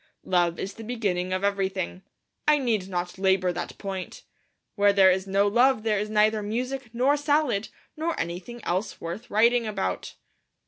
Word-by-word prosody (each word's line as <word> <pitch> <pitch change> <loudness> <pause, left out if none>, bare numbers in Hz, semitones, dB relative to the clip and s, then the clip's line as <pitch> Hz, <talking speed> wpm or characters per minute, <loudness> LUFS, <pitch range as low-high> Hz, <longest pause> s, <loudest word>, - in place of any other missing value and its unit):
Love 175 -2 +2
is 195 - -4
the 225 - -10
beginning 200 -6 -2
of 185 +1 -1
everything; 190 -2 -1 0.5
I 300 0 +6
need 220 -8 -1
not 180 0 -4
labour 190 -2 +2
that 175 0 -5
point. 190 -2 -6 0.5
Where 205 -1 +4
there 195 -2 +6
is 190 +1 -1
no 200 +1 +2
love 240 +2 +3
there 215 -2 +1
is 210 +1 -3
neither 215 0 +3
music 250 +4 -3
nor 255 +5 +2
salad, 290 -7 +1 0.3
nor 325 +1 -2
anything 180 +8 -5
else 185 +5 -2
worth 175 +8 -6
writing 235 +2 +3
about. 205 -3 -3
205 Hz, 165 wpm, -26 LUFS, 190-235 Hz, 0.5 s, I